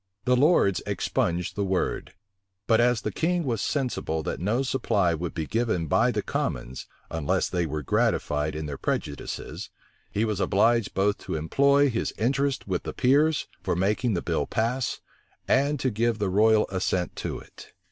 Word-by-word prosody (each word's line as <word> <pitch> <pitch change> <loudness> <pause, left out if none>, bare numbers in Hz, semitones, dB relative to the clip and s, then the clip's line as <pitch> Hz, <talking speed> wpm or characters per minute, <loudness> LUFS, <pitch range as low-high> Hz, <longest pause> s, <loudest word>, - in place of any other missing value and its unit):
The 125 - +4
lords 125 - +3
expunged 90 +3 -1
the 100 - -1
word; 95 -2 -2 0.5
but 115 0 +4
as 120 -2 +3
the 105 - -3
king 170 - 0
was 120 -7 -1
sensible 120 - -1
that - - -3
no 110 +8 0
supply 105 -9 +1
would 85 +1 -4
be 80 - -2
given 110 -4 0
by 75 - +3
the - - -1
commons, 60 +1 -3 0.2
unless 80 -3 0
they 85 -2 -1
were 75 0 -4
gratified 75 +3 0
in 80 0 -4
their 70 -2 -6
prejudices, 70 -3 -4 0.4
he 105 +3 0
was 105 -3 -2
obliged 110 +2 +2
both 100 +1 +1
to - - -5
employ 140 - +3
his 115 -4 -2
interest 135 +2 0
with 90 -2 -1
the - - -6
peers 145 +4 +3 0.2
for - - -1
making 105 +5 +1
the 85 - -2
bill - - -1
pass, 120 +3 -1 0.5
and 140 +2 +2
to 130 - +1
give 115 +1 0
the 100 -3 -1
royal 110 +2 +4
assent 95 -1 -1
to - - -3
it. - - -14
105 Hz, 170 wpm, -26 LUFS, 90-125 Hz, 0.5 s, The